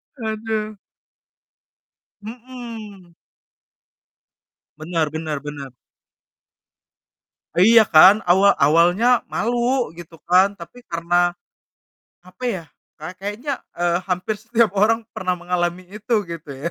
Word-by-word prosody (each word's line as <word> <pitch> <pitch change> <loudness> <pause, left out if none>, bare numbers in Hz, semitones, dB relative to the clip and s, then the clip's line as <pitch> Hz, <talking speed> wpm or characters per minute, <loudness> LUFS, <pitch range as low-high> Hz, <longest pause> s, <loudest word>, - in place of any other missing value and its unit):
Aduh. 220 -2 -4 1.4
Mhm. 225 -5 -10 1.7
Benar 160 -1 -1
benar 155 -2 -4
benar. 145 -3 -8 1.8
Iya, 225 +6 +7
kan. 185 +6 +7
Awa 190 +3 +5
awalnya 175 - +3
malu, 240 0 -1
gitu 165 -1 -13
kan, 185 +2 +5
tapi 245 +9 -12
karena, 175 +1 +1 0.9
apa 185 +7 -19
ya, 195 -8 -2 0.4
kay 155 +4 -7
kayaknya, 210 +9 -4 0.2
eee, 175 0 0
hampir 185 +3 -2
setiap 225 -1 +1
orang 225 +3 +3
pernah 185 -1 -2
mengalami 175 0 -2
itu, 215 0 0
gitu 165 -3 -8
ya. 150 +6 -5
185 Hz, 95 wpm, -21 LUFS, 170-225 Hz, 1.8 s, Iya